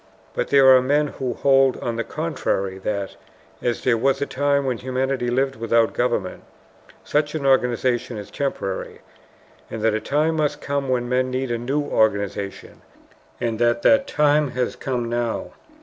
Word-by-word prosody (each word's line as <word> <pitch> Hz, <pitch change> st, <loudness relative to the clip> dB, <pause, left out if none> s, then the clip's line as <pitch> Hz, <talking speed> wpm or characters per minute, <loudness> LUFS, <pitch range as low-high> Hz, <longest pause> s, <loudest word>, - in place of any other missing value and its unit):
But -, -, -2 dB
there 140 Hz, -1 st, +5 dB
are 130 Hz, -, +5 dB
men 145 Hz, +4 st, +2 dB
who 125 Hz, -4 st, -4 dB
hold 135 Hz, -1 st, +3 dB
on 120 Hz, -1 st, -3 dB
the 115 Hz, -, -2 dB
contrary 115 Hz, -10 st, -2 dB
that, 100 Hz, 0 st, -3 dB, 0.4 s
as 120 Hz, -2 st, -2 dB
there 120 Hz, -3 st, +2 dB
was 135 Hz, +2 st, +2 dB
a -, -, 0 dB
time 140 Hz, 0 st, 0 dB
when 125 Hz, -3 st, -1 dB
humanity 130 Hz, 0 st, -1 dB
lived 135 Hz, +2 st, 0 dB
without 115 Hz, 0 st, +2 dB
government, 120 Hz, -7 st, -1 dB, 0.6 s
such 150 Hz, +1 st, 0 dB
an 145 Hz, -3 st, -3 dB
organization 125 Hz, -2 st, +1 dB
is 105 Hz, -, -8 dB
temporary, 115 Hz, -9 st, -4 dB, 0.7 s
and 110 Hz, -1 st, -6 dB
that 110 Hz, -1 st, +3 dB
a 110 Hz, -, 0 dB
time 155 Hz, +3 st, 0 dB
must 150 Hz, -1 st, 0 dB
come 140 Hz, -2 st, -2 dB
when 125 Hz, -1 st, 0 dB
men 130 Hz, +1 st, +1 dB
need 130 Hz, 0 st, -2 dB
a 120 Hz, -, -1 dB
new 135 Hz, +5 st, -1 dB
organization, 100 Hz, -5 st, -1 dB, 0.6 s
and 115 Hz, -2 st, -2 dB
that 120 Hz, 0 st, +2 dB
that 275 Hz, -1 st, +4 dB
time 150 Hz, 0 st, +3 dB
has 125 Hz, -1 st, -1 dB
come 125 Hz, -3 st, -3 dB
now. 120 Hz, -1 st, -2 dB
125 Hz, 165 wpm, -22 LUFS, 115-140 Hz, 0.7 s, there